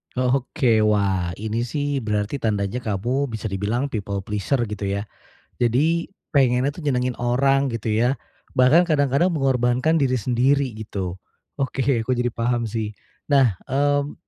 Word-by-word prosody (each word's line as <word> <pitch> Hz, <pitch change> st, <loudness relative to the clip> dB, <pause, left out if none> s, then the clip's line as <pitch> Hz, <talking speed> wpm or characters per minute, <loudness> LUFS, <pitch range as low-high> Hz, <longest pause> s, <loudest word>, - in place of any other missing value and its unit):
Oke, 125 Hz, -1 st, +1 dB
wah 95 Hz, -4 st, +1 dB
ini 110 Hz, +3 st, -3 dB
sih 145 Hz, 0 st, -1 dB
berarti 105 Hz, +3 st, -2 dB
tandanya 105 Hz, +1 st, -1 dB
kamu 120 Hz, +6 st, -1 dB
bisa 110 Hz, -3 st, -5 dB
dibilang 115 Hz, +8 st, -1 dB
people 100 Hz, -2 st, -3 dB
pleasure 105 Hz, +5 st, -1 dB
gitu 105 Hz, -2 st, -4 dB
ya, 100 Hz, +1 st, -1 dB, 0.5 s
jadi 150 Hz, +8 st, +2 dB, 0.2 s
pengennya 130 Hz, -2 st, +3 dB
tuh 150 Hz, +1 st, -8 dB
nyenengin 125 Hz, -2 st, 0 dB
orang 135 Hz, +2 st, +2 dB
gitu 115 Hz, -1 st, -3 dB
ya, 115 Hz, +5 st, +2 dB, 0.4 s
bahkan 145 Hz, +8 st, +5 dB
kadang-kadang 150 Hz, +2 st, +2 dB
mengorbankan 130 Hz, +1 st, +2 dB
diri 135 Hz, -4 st, +1 dB
sendiri 130 Hz, +4 st, +2 dB
gitu. 95 Hz, -4 st, -5 dB, 0.4 s
Oke, 135 Hz, -1 st, -1 dB, 0.2 s
aku 130 Hz, -, +1 dB
jadi 120 Hz, 0 st, 0 dB
paham 120 Hz, +1 st, 0 dB
sih. 110 Hz, -1 st, -3 dB, 0.4 s
Nah, 125 Hz, -9 st, +4 dB
mmm, 145 Hz, +1 st, +1 dB
125 Hz, 140 wpm, -23 LUFS, 110-140 Hz, 0.5 s, bahkan